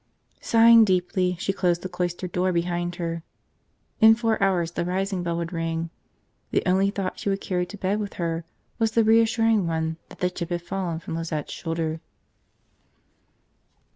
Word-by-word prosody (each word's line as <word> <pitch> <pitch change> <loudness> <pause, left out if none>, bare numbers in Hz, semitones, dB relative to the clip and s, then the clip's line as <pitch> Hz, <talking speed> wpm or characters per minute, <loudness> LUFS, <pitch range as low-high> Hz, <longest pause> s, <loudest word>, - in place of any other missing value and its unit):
Sighing 230 0 +6
deeply, 180 -1 +1
she 195 - -1
closed 175 -3 0
the - - -2
cloister 180 0 -3
door 180 +1 0
behind 175 0 -1
her. 165 -2 -3 0.8
In 220 0 +8
four 225 -2 0
hours 180 -4 +2
the 170 - -2
rising 190 +1 -1
bell 170 -1 -2
would 170 +1 -4
ring. 165 0 -2 0.6
The - - +1
only 190 +2 +3
thought 195 -2 -4
she - - -2
would 195 0 0
carry 180 -2 -2
to 210 - -9
bed 195 +2 0
with 205 -2 -4
her 165 -1 -2 0.4
was 225 -1 +1
the 230 - +4
reassuring 225 -2 +3
one 160 0 -1
that - - -13
the 180 0 0
chip 170 -2 -5
had 175 -1 -2
fallen 180 -2 -3
from 165 - -7
Lizette's 165 -2 -4
shoulder. 165 -1 -3
180 Hz, 170 wpm, -25 LUFS, 170-195 Hz, 0.8 s, In